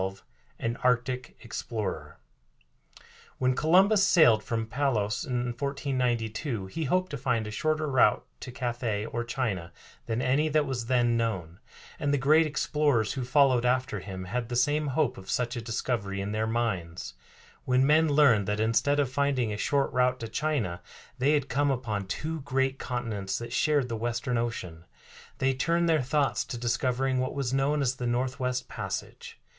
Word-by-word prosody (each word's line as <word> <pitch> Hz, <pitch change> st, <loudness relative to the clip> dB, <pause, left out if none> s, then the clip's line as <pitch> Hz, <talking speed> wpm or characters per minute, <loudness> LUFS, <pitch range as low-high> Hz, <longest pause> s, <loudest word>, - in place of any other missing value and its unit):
XII 95 Hz, +1 st, -4 dB, 0.4 s
AN 115 Hz, +1 st, -2 dB
ARCTIC 125 Hz, 0 st, 0 dB
EXPLORER 100 Hz, -10 st, -5 dB, 1.2 s
When 130 Hz, 0 st, +2 dB
Columbus 190 Hz, -, +4 dB
sailed 120 Hz, -, +5 dB
from 115 Hz, -1 st, -2 dB
Palos 110 Hz, -4 st, -1 dB
in 125 Hz, -1 st, -1 dB
1492 125 Hz, -4 st, -2 dB
he 155 Hz, +12 st, -4 dB
hoped 185 Hz, +6 st, 0 dB
to 145 Hz, -, -3 dB
find 115 Hz, -3 st, 0 dB
a 105 Hz, -, -6 dB
shorter 155 Hz, +7 st, 0 dB
route 125 Hz, -3 st, +3 dB
to 125 Hz, -, -7 dB
Cathay 120 Hz, -4 st, -2 dB
or 120 Hz, +1 st, -3 dB
China 110 Hz, -8 st, -3 dB, 0.4 s
than 115 Hz, 0 st, -1 dB
any 135 Hz, +5 st, +2 dB
that 155 Hz, 0 st, +2 dB
was 125 Hz, -4 st, -3 dB
then 120 Hz, -2 st, +2 dB
known, 95 Hz, -8 st, -2 dB, 0.4 s
and 145 Hz, -, 0 dB
the 145 Hz, -, +3 dB
great 155 Hz, +4 st, +4 dB
explorers 145 Hz, -6 st, +1 dB
who 130 Hz, -, -3 dB
followed 130 Hz, -1 st, +4 dB
after 125 Hz, -3 st, 0 dB
him 95 Hz, -1 st, -7 dB
had 115 Hz, +5 st, -3 dB
the 120 Hz, -, -3 dB
same 145 Hz, +4 st, +2 dB
hope 140 Hz, -2 st, 0 dB
of 95 Hz, 0 st, -12 dB
such 120 Hz, +2 st, -1 dB
a 120 Hz, -, -3 dB
discovery 110 Hz, -3 st, -2 dB
in 100 Hz, +1 st, -3 dB
their 110 Hz, +1 st, -1 dB
minds. 90 Hz, -, -2 dB, 0.5 s
When 130 Hz, +1 st, +3 dB
men 155 Hz, +2 st, +4 dB
learned 140 Hz, -9 st, +4 dB
that 105 Hz, +1 st, -1 dB
instead 115 Hz, +6 st, +2 dB
of 135 Hz, -3 st, +1 dB
finding 130 Hz, -5 st, 0 dB
a -, -, -4 dB
short 140 Hz, +6 st, 0 dB
route 125 Hz, 0 st, +2 dB
to 115 Hz, -, -4 dB
China 115 Hz, -, -2 dB, 0.4 s
they 140 Hz, +4 st, +3 dB
had 145 Hz, -3 st, +1 dB
come 145 Hz, +3 st, +1 dB
upon 110 Hz, -7 st, -2 dB
two 155 Hz, +9 st, -4 dB
great 135 Hz, 0 st, 0 dB
continents 110 Hz, -6 st, -3 dB
that 120 Hz, -, -6 dB
shared 145 Hz, -4 st, +2 dB
the 115 Hz, -, -3 dB
Western 120 Hz, +2 st, -1 dB
Ocean, 90 Hz, -8 st, -4 dB, 0.5 s
they 135 Hz, 0 st, +1 dB
turned 170 Hz, +6 st, +1 dB
their 160 Hz, -3 st, +3 dB
thoughts 140 Hz, +2 st, +1 dB
to 120 Hz, -, -5 dB
discovering 125 Hz, +2 st, 0 dB
what 130 Hz, +2 st, -2 dB
was 135 Hz, -3 st, -2 dB
known 140 Hz, +2 st, +1 dB
as 130 Hz, 0 st, 0 dB
the 125 Hz, -, -3 dB
Northwest 125 Hz, +1 st, -1 dB
Passage. -, -, -6 dB
125 Hz, 170 wpm, -28 LUFS, 110-140 Hz, 1.2 s, sailed